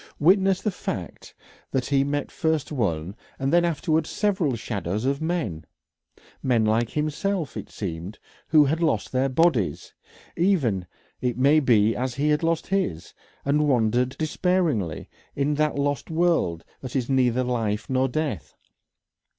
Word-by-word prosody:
Witness 190 +3 +3
the 210 - +1
fact 95 - -6 0.3
that 130 -2 -1
he 135 0 +2
met 145 0 -2
first 160 -3 -1
one, 95 - -1 0.2
and 135 +3 -1
afterwards 165 -2 +2
several 190 - 0
shadows 105 -1 -3
of 140 +2 0
men, 160 - -2 0.8
men 120 -4 +2
like 110 +2 +2
himself, 155 +3 -2
it - - -6
seemed, 90 +1 -6 0.3
who 155 -2 +6
had 160 +4 0
lost 155 -11 0
their 130 +1 +1
bodies 130 - +1 0.4
even 135 - +1 0.3
it 125 -1 -1
may 140 +4 +5
be 115 -6 +3
as 125 0 -2
he 145 +3 +1
had 150 0 +2
lost 165 -1 0
his, 180 - -2 0.3
and 150 +2 +2
wandered, 125 0 +2
despairingly, 155 - 0 0.3
in 140 +1 +1
that 150 0 0
lost 145 -2 -1
world 160 - +1
that 130 0 -8
is 125 -3 0
neither 130 -2 +2
life 115 -4 -1
nor 130 0 +1
death. 135 - -3
135 Hz, 140 wpm, -25 LUFS, 115-160 Hz, 0.8 s, who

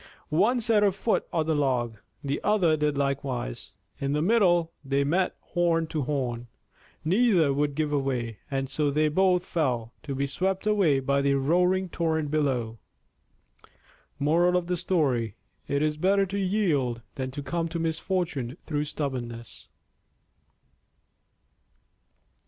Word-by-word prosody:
One 210 +11 +3
set 220 -2 +3
her 205 -1 +4
foot 205 +4 -1
on 160 -2 0
the 160 - +1
log. 125 -6 0 0.3
The 140 0 -2
other 190 -7 +3
did 150 -1 0
likewise. 140 - -2 0.3
In 140 0 -1
the 150 - +1
middle 175 -5 +3
they 140 0 +1
met 180 +6 +1 0.2
horn 170 -2 +2
to 155 - -2
horn. 125 -4 -2 0.6
Neither 180 - +3
would 145 0 0
give 155 -1 -1
way, 130 -6 -1
and 135 -1 -1
so 145 +2 0
they 150 +2 +2
both 185 +2 +2
fell, 125 -8 -1
to 140 -3 -5
be 140 +1 0
swept 190 +8 -2
away 190 -10 +3
by 140 +1 +1
the 140 0 +2
roaring 180 +7 +2
torrent 160 -3 -1
below. 125 -7 0 1.4
_It 170 -3 +2 0.5
is 150 +2 0
better 195 +4 +3
to 200 +1 -4
yield 160 - 0
than 130 -1 -4
to 140 +2 -6
come 165 +5 -2
to 170 +1 -4
misfortune 165 -5 -2
through 150 -2 -2
stubbornness. 120 -6 -5
150 Hz, 130 wpm, -27 LUFS, 135-180 Hz, 1.4 s, her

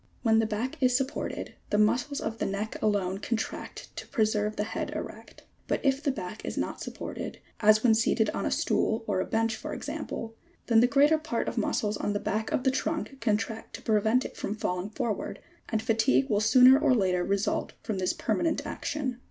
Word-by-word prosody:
When 220 -2 +4
the 225 - +2
back 250 +8 -3
is 250 -1 +4
supported, 270 +1 -3 0.2
the 210 - +1
mus 215 +5 +3
cles 285 -1 -5
of 225 +1 -4
the - - 0
neck 200 +2 -3
alone 195 -3 +1
contract 220 +1 -4
to - - -6
preserve 215 -2 +1
the - - -1
head 220 - -3
erect; - - -8 0.2
but - - 0
if 270 0 +2
the 300 - 0
back 215 -5 -5
is - - -5
not - - -2
supported - - -6 0.2
(as 215 0 +5
when 235 -3 +6
seated 220 0 +2
on - - -3
a - - 0
stool 225 +1 +1
or 200 -3 0
a - - -2
bench 225 0 +1
for - - -6
example) 225 0 -5 0.3
then 230 -2 +5
the 240 - +6
greater 290 +4 +4
part 310 -7 -2
of - - -2
muscles 210 -1 0
on 205 - -1
the 205 - -1
back 220 +2 -2
of 255 - 0
the 265 - +3
trunk 280 0 -2
contract 225 0 -1
to - - -10
prevent 220 +3 +2
it - - -7
from 205 - -3
falling 180 -2 -2
forward, 215 0 -3 0.3
and 220 -1 -1
fatigue 135 - +3
will 205 - +3
sooner 255 +4 +7
or 275 -4 +4
later 185 -5 +2
result 200 +2 -1
from 215 -4 -2
this 185 - +1
permanent 330 -2 -1
action. 265 -5 -3
220 Hz, 205 wpm, -28 LUFS, 210-255 Hz, 0.3 s, sooner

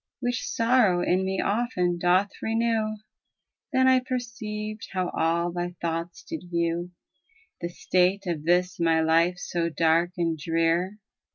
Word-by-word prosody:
Which 245 -1 -2
sorrow 230 -7 +3
in 185 +1 +2
me 190 0 -1
often 200 -6 0
doth 180 +3 +3
renew. 225 -1 0 0.8
Then 260 -1 +3
I 260 0 +6
perceived 225 -4 -5
how 185 -1 -1
all 170 +2 0
thy 175 0 -4
thoughts 170 +1 -4
did 320 - -7
view 170 0 -1
^ - - -46 0.7
The 170 - -2
state 185 +3 +1
of 165 -4 -3
this 180 +2 +1
my 165 -1 +3
life 165 +2 +3
so 170 -1 -2
dark 165 +2 +2
and 165 -2 0
drear. 165 +5 0
180 Hz, 145 wpm, -26 LUFS, 170-215 Hz, 0.8 s, I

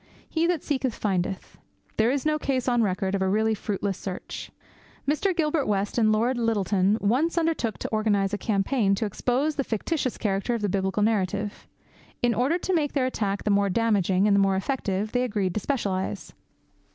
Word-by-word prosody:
He 330 +1 +1
that 345 -4 0
seeketh, 265 -5 -1
findeth. 190 -2 -2 0.4
There 220 +2 +3
is 275 +2 -1
no 305 0 +1
case 265 -3 -1
on 240 -2 +3
record 190 -2 0
of 195 - 0
a 190 - +2
really 220 +2 +2
fruitless 200 -2 -3
search. 190 -2 -6 0.6
Mr. 345 +6 +1
Gilbert 305 -2 +1
West 205 +2 0
and 215 -1 +4
Lord 240 +4 +1
Lyttelton 205 -3 +2
once 270 +12 +1
undertook 320 -9 0
to - - -4
organize 210 -2 +1
a - - +1
campaign 200 0 +1
to 220 - -1
expose 255 +8 0
the 275 - +1
fictitious 255 - -2
character 200 +3 -1
of 225 - -4
the 205 - +1
biblical 190 +2 0
narrative. 205 -1 -1 0.6
In 240 -1 +4
order 260 +9 +1
to 370 +1 -2
make 300 -4 +1
their 270 -3 +1
attack 205 -6 -2
the 210 - +1
more 200 0 +3
damaging 200 -3 +2
and 205 - +4
the - - +4
more 195 -1 +3
effective 205 -1 -2
they 245 - +1
agreed 205 -7 -1
to - - -1
specialize. 200 -7 -2
215 Hz, 190 wpm, -26 LUFS, 195-260 Hz, 0.6 s, and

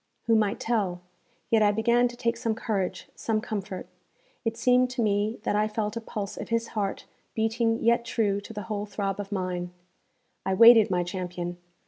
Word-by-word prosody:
Who 230 - +3
might 210 -2 +1
tell? 200 -7 -1 0.5
Yet 225 -1 +5
I 205 -1 +5
began 235 +3 +3
to 240 - -9
take 235 -1 0
some 230 -1 -1
courage, 200 -5 -3
some 220 -1 -1
comfort. 200 -4 -5 0.6
It 225 -1 -2
seemed 250 +1 +4
to 250 -2 -1
me 210 +2 +1
that 205 - 0
I 210 +1 +2
felt 215 0 -3
a 230 - -3
pulse 205 -3 -5
of - - -6
his 230 0 0
heart 200 -3 -3 0.3
beating 225 +1 +1
yet 235 +1 +3
true 205 -4 0
to 205 - -10
the 210 -2 -5
whole 210 -1 -4
throb 200 -1 -3
of 205 0 -5
mine. 180 -2 -2 0.7
I 190 - 0
waited 230 0 +8
my 180 -1 +1
champion. 175 -1 -5
215 Hz, 185 wpm, -27 LUFS, 195-230 Hz, 0.7 s, waited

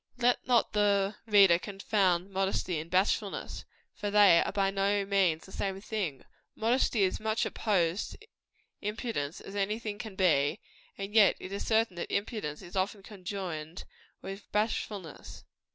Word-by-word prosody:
Let 245 0 +1
not 245 -2 +3
the 205 -1 +2
reader 195 -5 +6
confound 195 -2 0
modesty 190 -3 -1
and 160 +2 -7
bashfulness; 195 +3 0 0.3
for 205 - -4
they 200 -4 +6
are - - -1
by 195 -1 +1
no 200 +1 +1
means 190 -5 +1
the 190 - -14
same 195 -1 -3
thing. 195 - -4 0.3
Modesty 230 -1 +2
is 185 - +1
as - - -18
much 220 +1 0
opposed 185 -4 0
to 435 - -15 0.5
impudence 210 - -3
as 195 - -10
any 205 +2 0
thing 215 -3 -6
can 215 -4 -7
be; 165 -3 +2 0.4
and 195 +1 -6
yet 215 -3 +6
it 185 - -8
is 200 - -4
certain 220 -5 +2
that 170 - -4
impudence 200 - -3
is 175 +1 -11
often 195 +1 -1
conjoined 185 -5 -6 0.4
with 195 +1 -8
bashfulness. 210 -5 -3
195 Hz, 155 wpm, -30 LUFS, 185-210 Hz, 0.5 s, reader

